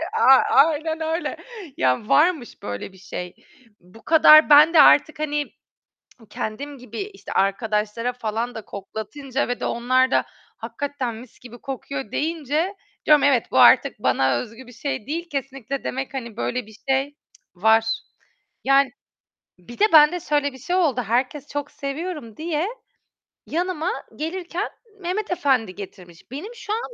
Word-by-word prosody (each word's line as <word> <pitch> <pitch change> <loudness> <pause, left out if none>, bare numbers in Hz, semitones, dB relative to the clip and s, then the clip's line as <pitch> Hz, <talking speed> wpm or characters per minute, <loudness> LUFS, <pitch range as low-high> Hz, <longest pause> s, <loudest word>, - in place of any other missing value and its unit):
E 325 - -3
a 265 -11 +7
aynen 315 +3 +3
öyle. 320 +2 -2 0.4
Ya, 130 +11 0
varmış 310 -5 +2
böyle 100 - -6
bir 190 - -18
şey. 180 -1 -7 0.5
Bu 180 +6 -18
kadar, 310 -1 +7
ben 300 +3 +7
de 310 - +8
artık 295 +1 +5
hani, 295 -1 -1 0.8
kendim 280 +7 -5
gibi 240 -3 -9
işte 390 0 -9
arkadaşlara 210 +4 0
falan 230 0 -4
da 220 - -5
koklatınca 245 +8 -5
ve 245 - -3
de - - -3
onlar 255 +2 +1
da, - - +3 0.3
"Hakikaten 280 -5 -4
mis 240 +1 -13
gibi 240 -1 -12
kokuyor." 270 -2 -6
deyince, 320 +4 -1 0.5
evet, 270 -5 +2
bu - - +2
artık - - +6
bana 130 -2 +2
özgü 230 - -9
bir - - -12
şey 235 -3 -5
değil, 335 +3 -4
kesinlikle 275 -1 -5
demek, 265 +2 -4
hani, 235 -5 -6
böyle 245 -1 -2
bir 220 - -15
şey 270 +2 0 0.4
var. 220 +4 +4 0.8
Yani, 275 -1 +4 0.7
bir 210 +7 -13
de 420 - +6
ben 300 0 +8
de 355 - -3
şöyle 290 -4 -1
bir - - -11
şey 355 +8 -2
oldu, 300 -9 +2
herkes 255 +5 -1
çok 290 -1 -5
seviyorum 280 -4 -6
diye 320 +1 -2 0.8
yanıma 350 0 -2 0.3
gelirken 350 +4 -4 0.3
Mehmet 380 +4 -3
Efendi 260 - +1
getirmiş. 180 -4 -11
Benim 355 - -7
şu 425 -2 -6
an 450 - 0
275 Hz, 150 wpm, -22 LUFS, 230-310 Hz, 0.8 s, de